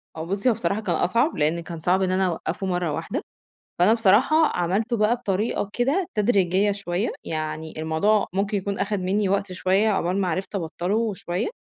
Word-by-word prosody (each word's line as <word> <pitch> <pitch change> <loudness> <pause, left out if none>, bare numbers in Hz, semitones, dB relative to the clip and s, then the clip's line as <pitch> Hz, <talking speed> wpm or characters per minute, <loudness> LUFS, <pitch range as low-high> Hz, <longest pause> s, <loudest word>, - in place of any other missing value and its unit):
آه 160 - -4
بُصّي 200 +7 0
هو 235 - +4
بصراحة 200 +3 -1
كان 175 -5 -1
أصعب، 235 - +1
لإن 155 +3 +1
كان 165 -1 -7
صعب 180 +4 +2
إن 185 - +1
أنا 190 +1 +2
أوقفه 180 +2 -3
مَرّة 180 -3 -1
واحدة، - - -3 0.6
فأنا 200 +6 +5
بصراحة 225 +6 +4
عملته 200 +8 -1
بقى 215 +3 +3
بطريقة 205 -2 -1
كده 285 +10 +1
تدريجية 200 -2 +2
شوية، 200 +1 -2
يعني 155 0 -4
الموضوع 160 +7 +2
ممكن 200 +2 0
يكون 200 +1 -3
أخَد 200 +1 -1
مني 190 +2 0
وقت 200 -1 0
شوية 190 +4 +2
عقبال 190 -1 0
ما 185 - 0
عرفت 185 +4 -3
أبطله 200 +5 -1
شوية، 175 -1 -3
195 Hz, 180 wpm, -24 LUFS, 175-210 Hz, 0.6 s, فأنا